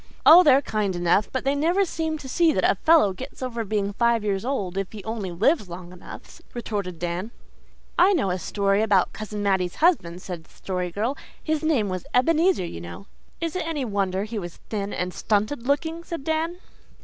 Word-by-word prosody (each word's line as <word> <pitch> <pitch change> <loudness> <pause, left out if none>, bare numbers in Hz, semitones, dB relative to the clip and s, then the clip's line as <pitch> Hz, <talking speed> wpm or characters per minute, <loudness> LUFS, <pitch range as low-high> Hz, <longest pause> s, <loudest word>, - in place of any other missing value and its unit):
"Oh, 335 +3 +10
they're 280 -4 +5
kind 210 -6 -1
enough, 175 +4 +2
but 260 - -2
they 275 - +3
never 340 +7 +2
seem 320 -2 -2
to 285 - -10
see 330 +5 +3
that - - 0
a - - +4
fellow 315 - +4
gets 260 +6 -8
over 235 -2 -3
being 205 -1 -1
five 235 0 +2
years 195 -2 -1
old 205 -9 -2
if 195 -1 -3
he 210 -3 -9
only 220 -3 -4
lives 210 - +1
long 175 +1 -9
enough," 180 - -12
retorted 200 -7 -4
Dan. 175 +5 -3 0.7
"I 375 +3 +6
know 200 - +1
a 185 - -2
story 200 +2 +1
about 205 -4 +2
Cousin 210 -1 -5
Mattie's 190 -3 +1
husband," 185 - +1
said 175 -4 -7
the - - -26
Story 180 -2 -4
Girl. 220 +9 -2 0.3
"His 310 -2 0
name 290 -10 +1
was 185 -2 -4
Ebenezer, 330 - +3
you 85 - -7
know 85 - -9 0.2
" - - -35
"Is 330 +1 -2
it 360 -3 -2
any 300 -5 -2
wonder 195 -3 -1
he 215 +1 -4
was 175 -3 -7
thin 205 -2 -2
and 180 0 -3
stunted 220 +4 -1
looking?" 320 +4 0
said 335 -4 -6
Dan. 320 +3 -1
215 Hz, 205 wpm, -24 LUFS, 190-295 Hz, 0.7 s, Oh